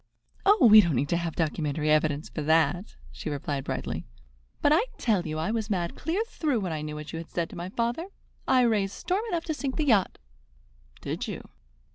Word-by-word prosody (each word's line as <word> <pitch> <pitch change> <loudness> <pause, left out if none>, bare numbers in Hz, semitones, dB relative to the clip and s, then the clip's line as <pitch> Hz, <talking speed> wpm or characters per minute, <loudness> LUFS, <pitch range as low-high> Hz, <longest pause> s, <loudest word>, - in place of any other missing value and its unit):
"Oh, 410 - +6
we 215 -1 +10
don't 170 -7 0
need 135 +4 0
to 170 - +2
have 170 -2 -3
documentary 155 -2 0
evidence 155 0 +2
for 155 - -5
that," 160 +4 +1 0.2
she - - -6
replied 140 -1 -3
brightly; - - -4 0.5
"but 290 - +3
I 325 - +5 0.2
tell 200 -7 +1
you 155 0 -3
I 160 +6 -1
was 220 -1 -2
mad 175 -4 -1
clear 345 +8 -1
through 295 - -1
when 185 -3 -2
I 155 - -3
knew 150 0 -5
what 150 +1 -8
you - - -3
had 165 - -9
said 170 -2 -3
to - - -9
my 175 +1 -5
father. 235 - -2 0.4
I 260 -1 +5
raised 210 -5 +2
storm 375 +3 -1
enough 340 -4 -2
to 315 - -1
sink 275 -3 -3
the 310 - 0
yacht." 215 -9 +3 0.8
"Did - - -4
you?" - - -7
180 Hz, 210 wpm, -27 LUFS, 155-245 Hz, 0.8 s, we